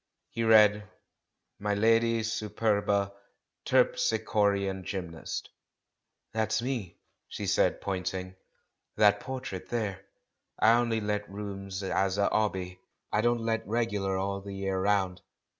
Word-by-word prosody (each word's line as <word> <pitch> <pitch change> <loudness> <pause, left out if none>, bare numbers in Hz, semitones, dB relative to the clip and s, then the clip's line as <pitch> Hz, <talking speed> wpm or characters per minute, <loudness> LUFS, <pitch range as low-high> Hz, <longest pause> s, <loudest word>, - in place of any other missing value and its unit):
He 115 - -2
read, 105 -2 +5 0.7
"Mdlle. 115 +3 +3
Superba: 105 -3 0 0.5
Terpslchorean 105 - +2
Gymnast." 90 -4 -5 0.9
"That's 110 0 +1
me," 120 -7 -3 0.3
she - - -5
said, - - +2
pointing, 95 -1 -3 0.6
"that 105 -1 +5
portrait 125 -9 -6
there. 105 -5 -2 0.5
I 115 - +6
only 115 -2 +2
let 105 0 -2
rooms 100 -1 -6
as 95 0 0
a 100 - +3
'obby 95 -4 -1 0.2
— - - -50
I 105 - +3
don't 120 0 +2
let 115 0 -1
regular 105 -4 0
all 100 +1 -2
the 100 0 -7
year 95 -1 -1
round. 95 -2 +1
105 Hz, 115 wpm, -29 LUFS, 95-115 Hz, 0.9 s, I